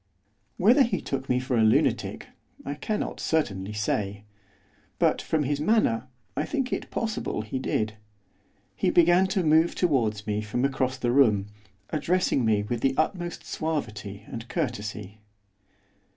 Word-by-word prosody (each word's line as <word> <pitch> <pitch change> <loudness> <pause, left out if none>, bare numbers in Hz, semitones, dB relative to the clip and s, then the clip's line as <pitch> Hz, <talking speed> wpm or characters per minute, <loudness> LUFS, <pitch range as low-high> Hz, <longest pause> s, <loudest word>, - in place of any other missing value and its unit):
Whether 235 +10 +5
he 240 -3 +2
took 135 -1 -4
me 125 - +3
for 130 0 -2
a 115 - +3
lunatic 110 - +2 0.4
I 140 - -2
cannot 210 +9 -3
certainly 105 -11 -1
say; 105 -1 -2 0.7
but, - - +2
from 155 -2 0
his 145 +1 -1
manner, 150 - +2 0.3
I - - 0
think 270 -4 -2
it - - -3
possible 220 - -2
he 110 +5 -4
did. 110 -4 -1 0.8
He - - +1
began 175 +2 +5
to 190 -1 0
move 160 +2 +4
towards 115 - +1
me 105 0 -1
from 110 +5 -1
across 130 -1 0
the 120 -2 0
room, 105 -7 +4 0.4
addressing 165 -3 +1
me 110 -2 +2
with 115 +2 -3
the 135 0 +2
utmost 175 +1 -1
suavity 105 -10 -4
and 115 0 -7
courtesy. 110 - -4
130 Hz, 145 wpm, -26 LUFS, 110-160 Hz, 0.8 s, Whether